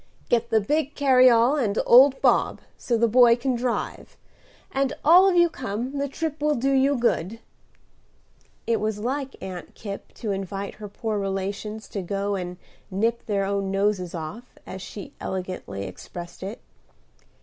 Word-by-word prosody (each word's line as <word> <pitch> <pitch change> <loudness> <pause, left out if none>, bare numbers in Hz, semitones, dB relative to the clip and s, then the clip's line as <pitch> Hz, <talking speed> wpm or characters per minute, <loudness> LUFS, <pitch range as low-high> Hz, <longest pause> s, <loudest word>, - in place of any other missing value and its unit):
"Get 235 0 +2
the 225 -2 +4
big 295 +6 -1
carryall 255 -1 +5
and 205 -2 -1
old 265 +2 +7
Bob, - - +3
so 235 - -1
the 235 +1 +3
boy 235 +1 +6
can 255 +2 -1
drive, 240 0 -3 0.5
and 270 0 0
all 360 +5 +7
of 370 - +1
you 345 0 +6
come; 255 -1 -4
the 280 - 0
trip 305 +1 -4
will 300 0 +2
do 270 +3 0
you 270 +1 +3
good." 225 -3 0 1.3
It 230 -1 +1
was 215 0 -1
like 265 +5 -3
Aunt 185 -2 -8
Kipp 200 -2 -8
to 220 -4 -4
invite 195 0 -4
her 210 - -5
poor 215 +1 -3
relations 200 +2 -4
to 200 - -4
go 200 +2 -2
and 180 -2 -4 0.3
"nip 225 +5 -1
their 200 -2 0
own 195 0 -1
noses 195 -2 0
off," 170 +10 -8
as 190 - -8
she 200 +1 -9
elegantly 180 - -5
expressed 170 - -9
it. 195 +4 -6
220 Hz, 160 wpm, -25 LUFS, 195-260 Hz, 1.3 s, old